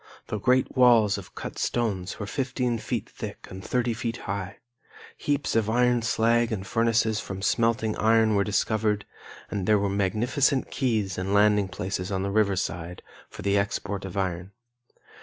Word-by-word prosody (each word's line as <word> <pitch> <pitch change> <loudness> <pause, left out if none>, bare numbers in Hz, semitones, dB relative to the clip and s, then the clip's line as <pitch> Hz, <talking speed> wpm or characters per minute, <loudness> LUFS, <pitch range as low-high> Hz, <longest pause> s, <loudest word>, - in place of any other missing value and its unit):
The 110 - -2
great 130 +5 +2
walls 115 -5 +5
of 95 - -13
cut - - -6
stones 100 -6 -1
were 100 - -3
15 125 -1 -1
feet - - -3
thick - - -8
and 95 0 -8
30 125 +1 0
feet 115 +1 -3
high. 95 0 -4 0.6
Heaps 145 -4 -1
of 110 -2 +2
iron 120 +1 +3
slag 115 0 +2
and 95 -3 -3
furnaces 115 0 +1
for 95 -3 -6
smelting 115 0 +1
iron 110 0 +4
were 100 -1 +3
discovered, 105 0 0 0.5
and 100 -3 -2
there 105 -1 +5
were 100 0 0
magnificent 120 +8 +1
quays 110 -8 0
and 95 +2 -1
landing 105 -1 +4
places 90 +1 -4
on 95 -1 -1
the 100 - -2
river 100 -2 +2
side, 90 -1 -4 0.3
for - - -10
the 100 0 +2
export 100 0 -3
of 95 +1 -6
iron. 95 0 -2
105 Hz, 165 wpm, -26 LUFS, 100-115 Hz, 0.6 s, walls